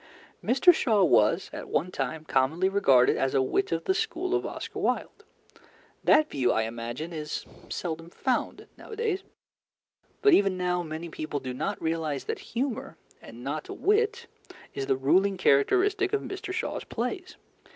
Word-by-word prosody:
Mr. 270 +9 +6
Shaw 220 - +2
was 120 - +3
at - - -7
one 180 +5 0
time 150 +1 -3
commonly 155 +7 +2
regarded 140 -11 +4
as 135 - 0
a 135 - +4
wit 165 +9 0
of 165 0 -1
the 380 - +2
school 375 -4 -2
of 380 - 0
Oscar - - -6
Wilde. - - -2 0.8
That 310 - +5
view, 130 -3 +1
I 110 - +1
imagine, 120 +8 -5
is 150 -1 -4 0.2
seldom 165 -1 -4
found 255 +7 -2
nowadays, 435 -4 -3 1.0
but 415 -3 +6
even 195 - +4
now 180 -1 0
many 160 0 -6
people 155 -2 -4
do 130 -1 -5
not 125 - -3
realize 160 -2 -2
that 445 -1 -4 0.2
humour, 255 -2 -2 0.2
and 120 +2 -11
not 150 +3 -4
wit, 450 +4 +1 0.5
is 135 - -4
the 135 - +2
ruling 190 +9 +3
characteristic 380 - +3
of 425 - +2
Mr. 390 0 -6
Shaw's 370 - -3
plays. 350 +11 -4
180 Hz, 155 wpm, -27 LUFS, -, 1.0 s, Mr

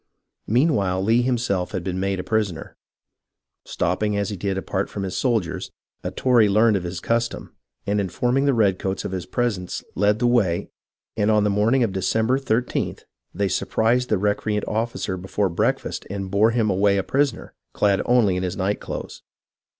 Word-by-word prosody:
Meanwhile 105 - +2
Lee 115 +4 +3
himself 115 -7 -1
had 95 -3 -2
been 90 +1 -3
made 95 0 -1
a - - -3
prisoner. 105 -7 -2 0.9
Stopping 100 +4 -1
as 100 0 -1
he - - -3
did 95 +1 -2
apart 95 0 -2
from 100 - -5
his 95 - -4
soldiers, 115 -10 -1 0.3
a - - -2
Tory 120 -5 +3
learned 110 +2 +4
of 95 - 0
his 85 0 -5
custom, 115 +4 -2 0.3
and 100 0 +1
informing 125 +8 0
the 140 - +3
redcoats 95 -3 0
of - - -3
his 95 -2 -4
presence 105 -7 -2
led 105 +2 +2
the 120 - 0
way; 110 -9 +1 0.4
and 105 -1 +1
on 105 -1 +4
the 105 - +2
morning 110 +6 +3
of 105 -5 -1
Decem 105 +4 0
ber 130 +3 +2
13th 125 -2 -1 0.3
they 100 - -1
surprised 120 +6 +1
the 105 - +2
recreant 105 +1 0
officer 110 -4 -2
before 95 +2 -1
breakfast 85 - -1
and 95 -1 -5
bore 105 +3 +4
him 115 -3 +1
away 100 +1 +3
a 95 - 0
prisoner, 140 0 -1 0.2
clad 100 -2 +2
only 120 -6 +4
in - - -2
his 90 0 -3
night 100 +2 0
clothes. - - -7
105 Hz, 180 wpm, -23 LUFS, 95-115 Hz, 0.9 s, learned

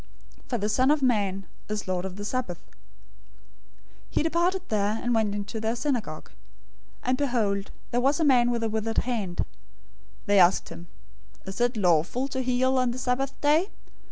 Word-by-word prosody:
012:008 - - -28
For 240 - 0
the 210 -1 -1
Son 255 +5 +3
of 295 -1 +3
Man 200 -6 +1 0.2
is 210 -1 -3
Lord 185 0 -1
of 190 -1 -6
the 205 +1 -6
Sabbath." 225 -7 -2
012:009 100 - -28 1.4
He - - 0
departed 345 +3 +1
there, 210 +1 0
and 245 - 0
went 215 -3 +1
into 205 +2 -4
their 220 +2 -1
synagogue. 235 - -3
012:010 - - -25 0.7
And 255 +1 +1
behold 215 -8 0 0.2
there 245 - +1
was 275 +4 +2
a - - +2
man 245 -4 +5
with 235 -1 -1
a 225 - 0
withered 220 +1 -2
hand. 215 -8 -1 0.8
They 205 -1 +4
asked 180 +1 +4
him, 170 - -10 0.6
"Is 195 +4 -5
it 240 -1 +2
lawful 180 - +2
to 260 - -2
heal 260 +1 +2
on 255 -1 +2
the 240 - -4
Sabbath 255 +2 -1
day?" 310 +7 +3
235 Hz, 185 wpm, -26 LUFS, 200-255 Hz, 1.4 s, man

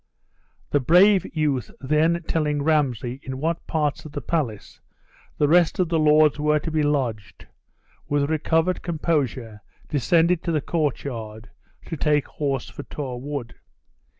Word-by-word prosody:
The 145 - +3
brave 180 +7 +5
youth 145 -6 0
then 155 +5 +1
telling 150 -3 0
Ramsay 130 -5 0
in 130 0 -6
what 165 +4 -2
parts 150 -3 -1
of 155 - -11
the 145 - -3
palace 125 -9 -3 0.6
the 145 - +3
rest 170 +2 +4
of 180 -3 +1
the 165 -1 +1
lords 150 -1 +4
were 150 0 +2
to 160 +2 -4
be 155 0 +1
lodged, 125 -9 -2 0.6
with 145 -1 +1
recovered 160 +3 +1
composure 140 -10 -2 0.3
descended 165 +4 +2
to 170 - -2
the 155 - +1
courtyard, 125 -8 -3 0.3
to 165 - -5
take 150 -1 +1
horse 140 -4 -3
for - - -8
Tor 130 -4 -6
Wood. 140 -4 -5
150 Hz, 145 wpm, -23 LUFS, 135-160 Hz, 0.6 s, brave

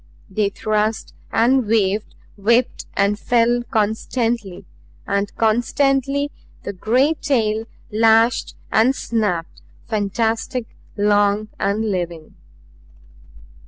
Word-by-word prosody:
They 205 +1 +1
thrust 215 +1 -1 0.2
and 245 +1 +3
waved, 210 -1 +1 0.2
whipped 230 +5 +1
and 200 +1 +1
fell 240 +1 +2
constantly; 220 -2 -1 0.4
and 200 0 -1
constantly 275 +5 +1 0.3
the 200 - -4
great 255 - +1
tail 220 -5 +1 0.3
lashed 225 +2 +3 0.2
and 240 +5 +4
snapped, 205 -10 -2 0.3
fantastic, 225 +3 -1 0.3
long 205 +1 +2
and 210 +2 0
living. 170 -4 -4
220 Hz, 90 wpm, -20 LUFS, 205-235 Hz, 0.4 s, and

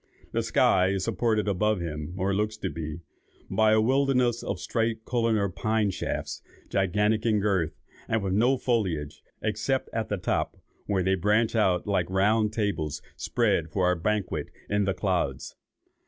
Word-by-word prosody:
The - - 0
sky 90 - +3
is 95 -1 0
supported 110 0 0
above 105 +1 +1
him, 80 0 -5
(or 95 +1 0
looks 105 +2 -1
to 95 -4 -3
be,) 80 0 -5 0.5
by 110 -1 +4
a 110 - +5
wilderness 125 0 +2
of - - -3
straight 115 -1 -1
columnar 115 -4 +1
pine 110 +2 0
shafts, - - -4 0.3
gigantic 105 +3 +1
in 110 -3 +2
girth, 95 -7 0 0.3
and 110 -2 0
with 95 -1 -1
no 120 +6 +3
foliage 90 - -1 0.2
except 110 +5 -1
at 110 -1 -2
the 105 - -1
top, 90 - -1 0.3
where 95 -3 +1
they 95 +1 +2
branch 105 +5 +2
out 95 -5 +2
like 95 -4 0
round 105 +3 +2
tables 80 -10 -2
spread 80 -1 0
for 90 +1 +2
a - - +1
banquet 90 -4 -1 0.2
in 105 0 +1
the 95 0 0
clouds. 90 -8 -1
105 Hz, 160 wpm, -27 LUFS, 90-110 Hz, 0.5 s, a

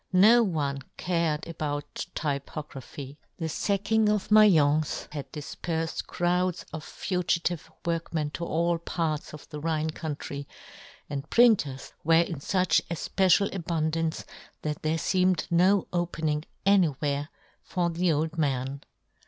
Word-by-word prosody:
No 215 +6 +7
one 150 -9 0 0.2
cared 165 -4 0
about 145 -3 -4
typography; 140 -1 -5 0.2
the 165 - -3
facking 205 +6 +1
of 210 -2 0
Maience 155 -9 +5
had 140 -3 -6
difperfed 160 +2 -4
crowds 180 0 0
of 160 -1 -5
fugitive 175 -3 -1 0.2
workmen 165 -3 -1
to 170 - -5
all 170 0 +1
parts 160 -3 -2
of 150 - -11
the 150 - -6
Rhine 160 0 -1
country, 145 -3 -5 0.6
and 145 +1 -5
printers 205 - +3
were 165 +1 +4
in 170 -2 -5
fuch 180 +2 +2
efpecial 190 +3 +2
abund 165 -3 -1
ance, 165 -1 -1 0.4
that 150 -1 -3
there 155 +1 0
feemed 185 0 +2
no 185 +3 +4
opening 160 -3 -1 0.2
anywhere 150 -6 +2 0.3
for 175 -1 -1
the 170 +1 +1
old 160 +2 -1
man. 135 -1 -1
160 Hz, 125 wpm, -27 LUFS, 150-180 Hz, 0.6 s, No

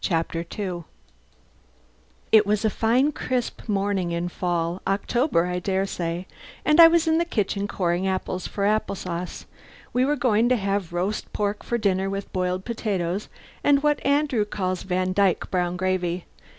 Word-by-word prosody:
CHAPTER 165 -1 0
TWO 175 -2 -5 1.5
It 215 -2 +6
was 210 +1 +1
a 215 - +2
fine, 245 +8 +2
crisp 250 -4 -3
morning 195 -3 0
in 170 +1 -2
fall 175 0 -2
October 200 - +1
I 180 0 -2
dare 190 +1 0
say 175 -1 -3 0.4
and 305 +2 +6
I 330 - +12
was 330 0 +3
in 320 0 +3
the - - +3
kitchen 205 - -1
coring 180 -1 0
apples 185 -1 -2
for 200 - -2
apple 210 -1 +1
sauce. 180 -1 -5 0.5
We 250 - +3
were 290 +3 +2
going 240 -3 +2
to 255 - +4
have 195 -4 -1
roast 185 +5 -2
pork 205 0 -1
for 235 - -1
dinner 195 -3 +1
with 195 0 -5
boiled 185 0 -1
potatoes 200 -5 -2 0.3
and 285 0 +4
what 295 -1 +2
Andrew 280 -5 +2
calls 185 -3 -2
Vandyke 185 0 +1
brown 180 -1 0
gravy. 185 -2 -1
195 Hz, 160 wpm, -24 LUFS, 180-225 Hz, 1.5 s, I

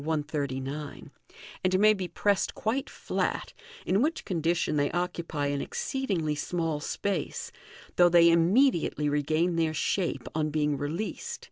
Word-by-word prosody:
139), 145 -2 -3 0.5
and 185 0 +3
may 215 +1 +6
be 190 -3 -4
pressed 200 +2 0
quite 245 +5 -1
flat, - - -2 0.3
in 195 +3 +2
which 310 +5 0
condition 170 -3 0
they 145 -1 +2
occupy 170 -4 -2
an 140 0 -1
exceedingly 265 - -2
small 160 0 -2
space, 185 +3 -3 0.5
though 175 0 +7
they 170 -1 +6
immediately 170 - +3
regain 155 +4 +1
their 160 -1 +1
shape 185 +1 -1
on 155 -1 0
being 150 -1 +1
re 145 +1 -3
leased. 220 - -4
165 Hz, 135 wpm, -28 LUFS, 150-195 Hz, 0.5 s, though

